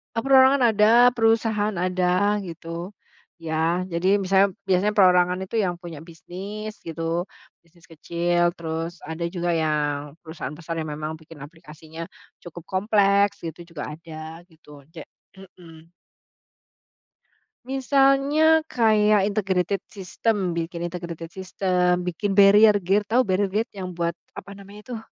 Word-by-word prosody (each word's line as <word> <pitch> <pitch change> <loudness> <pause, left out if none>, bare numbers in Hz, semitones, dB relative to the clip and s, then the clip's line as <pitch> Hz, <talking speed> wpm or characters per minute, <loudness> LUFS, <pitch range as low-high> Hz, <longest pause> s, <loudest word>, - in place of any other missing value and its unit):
Perorangan 260 0 +5
ada, 225 +4 +5
perusahaan 225 -3 +1
ada 185 +3 +1
gitu, 170 +1 -7 0.4
ya 165 +2 -1
jadi 185 +4 +2
misalnya 190 0 +2
biasanya 195 +2 +1
perorangan 180 -1 +4
itu 220 +4 -3
yang 180 -4 0
punya 170 -3 -10
bisnis 200 +6 -8
gitu, 165 0 -6 0.6
bisnis 170 0 -27
kecil 175 +2 0
terus 165 +1 -5
ada 160 +2 -4
juga 175 0 -1
yang 150 -3 -1
perusahaan 160 -3 -7
besar 165 +1 -6
yang 155 - -3
memang 155 +1 -5
bikin 160 -2 -14
aplikasinya 160 +1 -11 0.3
cukup 175 -1 -11
kompleks 200 +1 +1
gitu 170 +1 -8
juga 150 0 -5
ada 160 +1 -10
gitu 150 -4 -17
ja 160 - -8 0.3
mhm. 170 -4 -16 1.7
Misalnya 275 +4 +3
kayak 215 -3 +3
integrated 195 -2 -1
system, 195 -1 -2
bikin 170 +1 -4
integrated 170 -1 -7
system, 180 -1 0
bikin 195 +3 -2
barrier 205 +1 +7
gate 200 +2 0
tahu 250 +3 +3
barrier 195 0 0
gate? 215 +5 -2
Yang 190 -2 -6
buat 170 -1 -1 0.2
apa - - -9
namanya 200 +4 -12
tuh, 225 - -5
180 Hz, 125 wpm, -23 LUFS, 165-205 Hz, 1.7 s, barrier